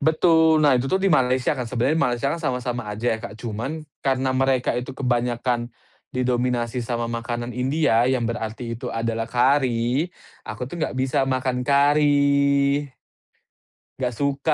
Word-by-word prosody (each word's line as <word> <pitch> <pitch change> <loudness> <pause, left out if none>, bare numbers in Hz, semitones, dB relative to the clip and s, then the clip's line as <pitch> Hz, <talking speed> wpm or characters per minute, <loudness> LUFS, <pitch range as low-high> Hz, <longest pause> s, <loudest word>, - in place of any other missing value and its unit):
betul. 160 -1 +4
Nah, 145 -4 +5
itu 125 +2 -1
tuh 190 - +2
di 195 - +2
Malaysia, 130 0 +2
kan. 125 - -3
Sebenarnya 125 +6 0
Malaysia 125 0 +1
kan 145 - -1
sama-sama 125 -4 -2
aja 110 +2 -1
ya, - - -11
Kak. 100 - -7
Cuman, 120 +7 -4 0.2
karena 130 -1 +1
mereka 130 -1 +1
itu 125 +2 -4
kebanyakan 120 -1 -1 0.4
didominasi 125 -1 0
sama 120 0 -2
makanan 120 +1 -4
India, 130 -2 +2
yang 125 -3 0
berarti 115 0 -4
itu - - -5
adalah 115 0 -2
kari, 125 +1 +2 0.4
aku 110 +3 -6
tuh 175 - -7
nggak 155 - -2
bisa 135 +1 +1
makan 130 -1 -1
kari. 140 0 +3 1.1
Nggak 125 -2 -1
suka. 140 +4 0
125 Hz, 150 wpm, -23 LUFS, 120-140 Hz, 1.1 s, Nah